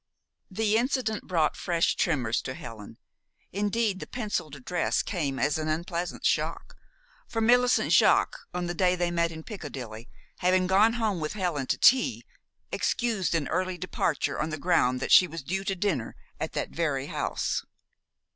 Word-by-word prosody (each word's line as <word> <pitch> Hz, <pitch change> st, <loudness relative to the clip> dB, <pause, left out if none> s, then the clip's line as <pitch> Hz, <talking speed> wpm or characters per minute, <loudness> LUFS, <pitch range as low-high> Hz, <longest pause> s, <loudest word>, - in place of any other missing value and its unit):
The 215 Hz, +2 st, +1 dB
incident 240 Hz, -3 st, -1 dB
brought 165 Hz, -4 st, +1 dB
fresh 170 Hz, -2 st, +1 dB
tremors 125 Hz, -9 st, 0 dB
to 130 Hz, -, -5 dB
Helen. 110 Hz, -5 st, -10 dB, 0.5 s
Indeed, 205 Hz, 0 st, 0 dB
the -, -, -7 dB
penciled 205 Hz, -, -3 dB
address 170 Hz, +6 st, -1 dB
came 150 Hz, -9 st, -2 dB
as 145 Hz, +3 st, +1 dB
an 155 Hz, -, -3 dB
unpleasant 170 Hz, +2 st, -3 dB
shock; -, -, -1 dB, 0.5 s
for 225 Hz, -, -3 dB
Millicent 245 Hz, +2 st, +3 dB
Jaques, -, -, +4 dB
on 180 Hz, 0 st, -3 dB
the 175 Hz, -, -2 dB
day 180 Hz, +1 st, +2 dB
they 175 Hz, -1 st, -1 dB
met 170 Hz, -1 st, +1 dB
in 160 Hz, -1 st, -8 dB
Piccadilly, 130 Hz, -, -8 dB, 0.3 s
having 185 Hz, +1 st, +3 dB
gone 200 Hz, +5 st, +4 dB
home 220 Hz, -6 st, -1 dB
with 155 Hz, -1 st, -3 dB
Helen 175 Hz, -10 st, -2 dB
to -, -, 0 dB
tea, 260 Hz, 0 st, +4 dB, 0.5 s
excused 220 Hz, -8 st, 0 dB
an 155 Hz, -3 st, 0 dB
early 185 Hz, +2 st, -1 dB
departure 160 Hz, -5 st, -1 dB
on 155 Hz, -, -1 dB
the 155 Hz, -, -4 dB
ground 140 Hz, -6 st, +2 dB
that -, -, -2 dB
she 180 Hz, -, +8 dB
was 165 Hz, -3 st, -7 dB
due 190 Hz, +7 st, -2 dB
to 195 Hz, -, -1 dB
dinner 175 Hz, -, -1 dB, 0.2 s
at -, -, -4 dB
that -, -, -3 dB
very 145 Hz, -5 st, -1 dB
house. -, -, -2 dB
175 Hz, 165 wpm, -27 LUFS, 155-205 Hz, 0.5 s, she